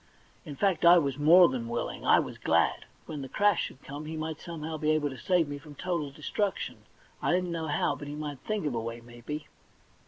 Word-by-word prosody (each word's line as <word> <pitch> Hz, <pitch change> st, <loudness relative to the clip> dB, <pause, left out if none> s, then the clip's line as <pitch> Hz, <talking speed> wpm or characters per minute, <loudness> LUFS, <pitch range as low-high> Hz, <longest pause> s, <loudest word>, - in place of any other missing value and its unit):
In 145 Hz, -, -7 dB
fact 190 Hz, +3 st, +1 dB
I 175 Hz, +1 st, +9 dB
was 140 Hz, -4 st, 0 dB
more 170 Hz, +4 st, +8 dB
than 125 Hz, -3 st, -3 dB
willing; 120 Hz, 0 st, -3 dB
I -, -, +7 dB
was -, -, -2 dB
glad. 85 Hz, +1 st, +2 dB, 0.2 s
When 150 Hz, -2 st, -6 dB
the 135 Hz, -, -7 dB
crash 205 Hz, +2 st, +3 dB
should 130 Hz, -, -11 dB
come, 145 Hz, +2 st, -7 dB
he 160 Hz, +1 st, -5 dB
might 155 Hz, 0 st, -4 dB
somehow 160 Hz, -2 st, -5 dB
be 150 Hz, 0 st, 0 dB
able 155 Hz, -2 st, +2 dB
to -, -, -7 dB
save 180 Hz, -4 st, +2 dB
me 145 Hz, 0 st, -5 dB
from 145 Hz, 0 st, -13 dB
total 170 Hz, -3 st, -2 dB
destruction; 170 Hz, +8 st, -2 dB, 0.4 s
I -, -, +1 dB
didn't 180 Hz, 0 st, +1 dB
know 165 Hz, -1 st, -3 dB
how, 145 Hz, -, +1 dB
but 145 Hz, -, -8 dB
he 145 Hz, -, -5 dB
might 150 Hz, -3 st, -5 dB
think 215 Hz, +3 st, -3 dB
of 145 Hz, -, -1 dB
a 115 Hz, -, -1 dB
way, 115 Hz, +1 st, -5 dB
maybe. 120 Hz, +6 st, -7 dB
150 Hz, 225 wpm, -29 LUFS, 140-170 Hz, 0.4 s, I